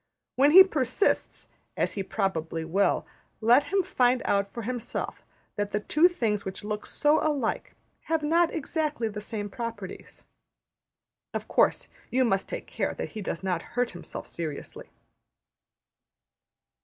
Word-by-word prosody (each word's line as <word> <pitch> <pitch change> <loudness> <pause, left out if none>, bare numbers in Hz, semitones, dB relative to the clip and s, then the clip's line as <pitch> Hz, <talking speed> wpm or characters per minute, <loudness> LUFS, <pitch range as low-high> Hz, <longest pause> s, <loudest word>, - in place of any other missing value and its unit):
When 275 +2 +5
he 375 +5 +11
persists, 310 - 0 0.3
as - - 0
he 200 - -2
probably 165 -5 -2
will, 195 +5 +1 0.3
let 240 +6 +5
him 390 +5 +1
find 250 -8 +2
out 200 0 +1
for 235 - -6
himself 240 0 -4 0.3
that 205 0 -2
the 210 - +2
two 305 +10 +4
things 225 - -1
which 190 +1 -6
look 210 0 -4
so 300 +1 +3
alike 285 -7 -1 0.3
have 320 -1 0
not 335 +3 +3
exactly 305 -5 -1
the 210 0 -6
same 210 -1 -4
properties. 215 -3 -7 1.1
Of - - -3
course, - - +2 0.2
you 255 +1 +2
must 195 -4 0
take - - -5
care - - -2
that - - -4
he 215 - -7
does 190 -2 -4
not 180 -3 0 0.2
hurt 245 -1 +2
himself 175 - -8
seriously. 155 -4 -6
230 Hz, 145 wpm, -27 LUFS, 200-295 Hz, 1.1 s, he